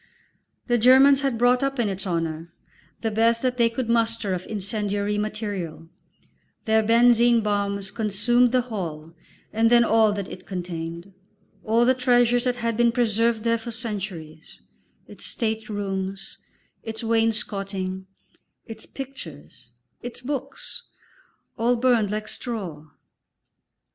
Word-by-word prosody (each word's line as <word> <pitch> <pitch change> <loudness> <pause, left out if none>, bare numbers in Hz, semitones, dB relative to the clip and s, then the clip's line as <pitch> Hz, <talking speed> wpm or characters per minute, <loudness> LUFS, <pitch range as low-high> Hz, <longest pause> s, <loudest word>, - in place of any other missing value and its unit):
The 240 -1 +1
Germans 265 +3 +6
had 270 -4 0
brought 245 +1 +3
up 275 0 -1
in 235 -3 +1
its 195 0 -4
honour 165 -1 -3 0.5
the 225 - -1
best 230 +2 +2
that 250 -1 0
they 235 -1 +4
could 235 +1 -3
muster 230 -3 +1
of 185 0 -5
incendiary 205 0 -2
material; 205 -7 -4 0.8
their 220 -1 +3
benzine 235 +1 +4
bombs 200 -1 -1
consumed 230 +3 +2
the 255 0 +3
Hall 170 -9 -6 0.4
and 225 +1 +3
then 240 0 +6
all 220 -1 +4
that 200 -2 -4
it 185 - -10
contained; 175 0 -6 0.5
all 230 +2 +3
the 260 - +5
treasures 245 -1 +3
that 250 -1 +1
had 230 -2 -2
been 235 +1 +3
preserved 230 -1 +1
there 230 0 +1
for 230 - -7
centuries, 195 -9 -6 0.5
its - - -7
state 220 -2 -2
rooms, 195 -2 -4 0.4
its 225 0 -6
wainscoting, 195 -4 -1 0.6
its 225 -1 -10
pictures, 180 - -10 0.3
its 245 0 -6
books, 275 - -5 0.8
all 240 +2 +3
burned 235 -4 +2
like 215 +1 -3
straw. 185 - -6
220 Hz, 130 wpm, -24 LUFS, 195-240 Hz, 0.8 s, Germans